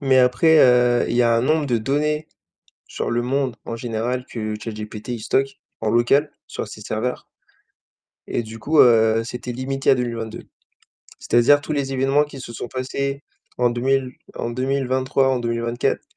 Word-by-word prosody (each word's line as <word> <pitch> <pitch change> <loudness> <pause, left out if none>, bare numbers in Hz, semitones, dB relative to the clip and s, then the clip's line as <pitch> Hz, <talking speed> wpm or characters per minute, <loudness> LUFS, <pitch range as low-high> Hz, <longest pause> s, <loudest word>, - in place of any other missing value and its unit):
mais 135 -2 +3
après, 140 +6 +4
heu, 125 -1 +4
il 120 - -1
y 125 - +4
a 115 -1 +3
un 115 - +2
nombre 155 +3 +1
de 125 -3 +1
données 150 +6 -1 0.6
sur - - -4
le 120 0 +1
monde 130 0 -1
en 115 - -4
général 120 +2 -3
que 110 -3 -4
ChatGPT, 105 0 -7
il 120 -2 -3
stocke 135 +5 -1 0.2
en 110 -1 0
local 135 +6 +3 0.2
sur - - -5
ses 110 - -10
serveurs 110 +4 -3 1.0
et 120 - -2
du 110 +1 -10
coup, 150 +8 +1
heu, 115 -2 +4
c'était 125 +1 -6
limité 135 +2 0
à - - +5
2022. 115 -3 -4 0.7
C'est-à-dire 145 +5 +4
tous 155 - -6
les 140 -2 -2
événements 135 +2 +2
qui 145 -2 -11
se 120 -2 -8
sont 120 - -6
passés 140 +3 -3 0.3
en 125 -1 +2
2000, 130 +1 0 0.2
en 120 - -3
2023, 130 +1 0
en 130 -1 +1
2024, 115 0 -1
125 Hz, 170 wpm, -21 LUFS, 115-135 Hz, 1.0 s, à